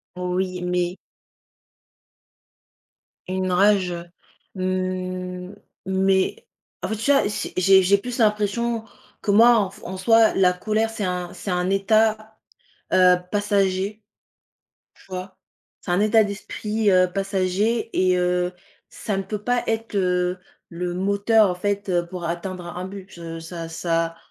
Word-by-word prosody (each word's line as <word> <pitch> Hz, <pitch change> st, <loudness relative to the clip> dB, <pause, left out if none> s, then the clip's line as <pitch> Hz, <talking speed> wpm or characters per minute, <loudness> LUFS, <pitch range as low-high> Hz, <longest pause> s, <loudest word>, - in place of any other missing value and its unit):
Oui, 180 Hz, 0 st, -2 dB
mais 180 Hz, 0 st, -1 dB, 2.3 s
Une 185 Hz, 0 st, -1 dB
rage, 190 Hz, 0 st, +3 dB
heu, 170 Hz, 0 st, -6 dB, 0.5 s
mmh 185 Hz, 0 st, -3 dB, 0.3 s
mais 190 Hz, -, +1 dB, 0.4 s
en -, -, -2 dB
fait 220 Hz, -, -1 dB
tu 225 Hz, +6 st, +1 dB
vois? 275 Hz, -7 st, +3 dB
C'est 205 Hz, -, -4 dB
j'ai 190 Hz, +1 st, +6 dB
j'ai 200 Hz, +2 st, +4 dB
plus 240 Hz, +4 st, -6 dB
l'impression, 220 Hz, +1 st, +1 dB, 0.4 s
que 205 Hz, -, 0 dB
moi 230 Hz, +4 st, +7 dB
en 200 Hz, -3 st, +1 dB
f -, -, -16 dB
en 190 Hz, -, -5 dB
soi, 225 Hz, +3 st, +4 dB
la 185 Hz, -1 st, +4 dB
colère, 215 Hz, +4 st, 0 dB
c'est 225 Hz, -2 st, -5 dB
un 180 Hz, -1 st, -3 dB
c'est -, -, -7 dB
un 180 Hz, 0 st, 0 dB
état, 215 Hz, +2 st, +1 dB, 0.6 s
heu, 180 Hz, -1 st, +6 dB, 0.2 s
passager, 205 Hz, 0 st, 0 dB, 0.9 s
tu -, -, -21 dB
vois? 185 Hz, 0 st, -7 dB, 0.4 s
C'est -, -, -4 dB
un 175 Hz, -, +2 dB
état 215 Hz, +1 st, +4 dB
d'esprit, 210 Hz, +1 st, -2 dB
heu, 185 Hz, 0 st, +5 dB
passager 195 Hz, +4 st, 0 dB
et 185 Hz, -1 st, +3 dB
heu, 180 Hz, 0 st, 0 dB, 0.4 s
ça 210 Hz, -, -4 dB
ne -, -, 0 dB
peut 210 Hz, +1 st, -5 dB
pas 245 Hz, +2 st, +1 dB
être, 225 Hz, -1 st, -2 dB
heu, 180 Hz, -1 st, +1 dB, 0.3 s
le 175 Hz, +1 st, -4 dB
moteur 200 Hz, +3 st, +3 dB
en -, -, -4 dB
fait 200 Hz, +1 st, -2 dB, 0.2 s
pour 180 Hz, -1 st, -6 dB
atteindre 175 Hz, +1 st, -4 dB
un 175 Hz, -, -8 dB
un 180 Hz, +1 st, -4 dB
but. 175 Hz, -4 st, -8 dB
Ça 165 Hz, 0 st, -7 dB
ça 165 Hz, 0 st, -1 dB
190 Hz, 145 wpm, -23 LUFS, 180-210 Hz, 2.3 s, moi